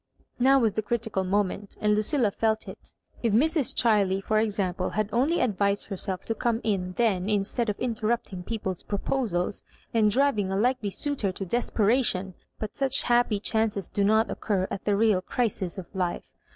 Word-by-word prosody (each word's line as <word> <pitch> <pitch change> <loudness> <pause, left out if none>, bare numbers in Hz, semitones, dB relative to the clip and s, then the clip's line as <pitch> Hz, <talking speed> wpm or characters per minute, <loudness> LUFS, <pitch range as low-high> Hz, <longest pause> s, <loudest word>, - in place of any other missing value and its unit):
Now 270 +2 +5
was 225 -6 +2
the 220 - -1
critical 220 -2 -2
moment, 200 +1 -2
and 210 0 +2
Lucilla 215 +2 +1
fek 220 +1 -1
it. - - -11 0.3
If 230 -3 +1
Mrs. 300 +4 +2
Chiley, 200 -5 +3
for 215 +1 +1
example, 195 -4 -1
had 215 0 -2
only 280 +9 +2
advised 200 -3 0
herself 190 -1 -4
to 225 - -1
come 230 0 0
in 190 -4 -1
then 205 -3 +1
instead 215 +3 0
of 205 - -3
interrupting 225 -5 -2
people's 190 -3 -4
proposals, 200 -3 -2 0.3
and 220 -2 +4
driving 220 -5 +1
a 195 - 0
likely 245 -1 +1
suitor 260 -3 -2
to 195 - -5
desperation 215 -2 +1
I - - -34 0.2
But 215 -1 -6
such 275 0 +2
happy 240 -3 +2
chances 215 -3 0
do 200 - -1
not 220 +2 +3
occur 190 -3 -1
at 195 - -5
the 205 - +2
real 210 -3 +3
crises 195 -4 -2
of 190 - -6
iifo. 180 -3 -2
210 Hz, 175 wpm, -26 LUFS, 195-235 Hz, 0.3 s, Now